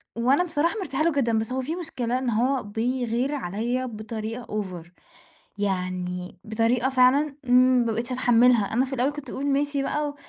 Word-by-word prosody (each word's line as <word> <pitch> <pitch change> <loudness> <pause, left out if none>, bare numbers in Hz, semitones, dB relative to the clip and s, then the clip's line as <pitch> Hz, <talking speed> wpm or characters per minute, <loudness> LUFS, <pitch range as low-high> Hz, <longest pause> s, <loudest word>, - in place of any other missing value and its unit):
وأنا 260 +9 +3
بصراحة 335 +1 0
مرتاحة 310 -5 -1
له 335 - +3
جدًا، 235 -6 +1
بس 220 +2 -2
هو 260 +1 -1
في 310 +6 -3
مشكلة 255 -8 -2
إن 255 -2 -2
هو 250 +4 +1
بيغير 245 +5 -1
عليّا 240 +3 -2
بطريقة 225 +1 -6
أوڤر، 185 -6 -5 0.7
يعني 180 -2 -3
بطريقة 230 +3 +1
فعلًا 270 +3 +3
ما 250 -1 +4
بقيتش 235 +3 -3
اتحمّلها. 245 -3 +4
أنا 250 +4 +2
في 265 - -8
الأول 265 +2 +1
كنت 295 -1 -8
باقول 275 - -4
ماشي 285 0 +1
بقى 295 +1 -2
250 Hz, 165 wpm, -25 LUFS, 225-275 Hz, 0.7 s, ما